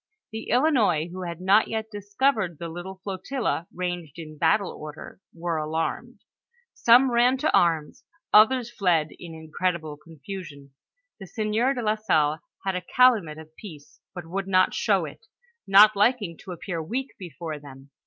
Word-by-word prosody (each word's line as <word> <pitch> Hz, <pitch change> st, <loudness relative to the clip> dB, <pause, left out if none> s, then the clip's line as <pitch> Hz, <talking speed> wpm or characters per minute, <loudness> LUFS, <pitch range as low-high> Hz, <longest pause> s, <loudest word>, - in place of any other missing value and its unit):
The 220 Hz, 0 st, -7 dB
Ilinois, 235 Hz, -, +2 dB
who 185 Hz, 0 st, -6 dB
had 170 Hz, -1 st, -6 dB
not 195 Hz, +4 st, +4 dB
yet 220 Hz, 0 st, -4 dB
discovered 205 Hz, -, -1 dB
the 170 Hz, +1 st, -6 dB
little 180 Hz, +3 st, -8 dB
flotilla 200 Hz, -2 st, -3 dB
ranged 175 Hz, -4 st, -5 dB
in 155 Hz, -2 st, -9 dB
battle 170 Hz, +6 st, +1 dB
order, 150 Hz, +4 st, -10 dB
were 170 Hz, -1 st, -3 dB
alarmed; 155 Hz, +1 st, -3 dB, 0.5 s
some 245 Hz, +3 st, +5 dB
ran 245 Hz, +2 st, +3 dB
to 295 Hz, -, +1 dB
arms, 160 Hz, -3 st, +1 dB, 0.3 s
others 240 Hz, +3 st, +5 dB
fled 175 Hz, -8 st, +1 dB
in 165 Hz, -2 st, -9 dB
incredible 160 Hz, -1 st, -3 dB
confusion. 150 Hz, -2 st, -10 dB, 0.5 s
The 195 Hz, -, -9 dB
sieur 220 Hz, +7 st, 0 dB
de 245 Hz, -, -3 dB
la 215 Hz, -1 st, +2 dB
Salle 155 Hz, -7 st, +1 dB, 0.3 s
had 190 Hz, -1 st, -1 dB
a 180 Hz, -, -2 dB
calumet 205 Hz, -7 st, +3 dB
of 160 Hz, 0 st, -13 dB
peace, 155 Hz, -8 st, -13 dB
but 175 Hz, -2 st, -7 dB
would 190 Hz, +3 st, -4 dB
not 185 Hz, -1 st, +3 dB
show 195 Hz, -6 st, +1 dB
it, 190 Hz, +9 st, -12 dB, 0.4 s
not 205 Hz, +2 st, +7 dB
liking 205 Hz, -4 st, +1 dB
to 185 Hz, -, -10 dB
appear 170 Hz, -1 st, -5 dB
weak 250 Hz, -, -4 dB
before 170 Hz, -3 st, -7 dB
tliem. 135 Hz, -1 st, -14 dB
185 Hz, 155 wpm, -25 LUFS, 160-215 Hz, 0.5 s, not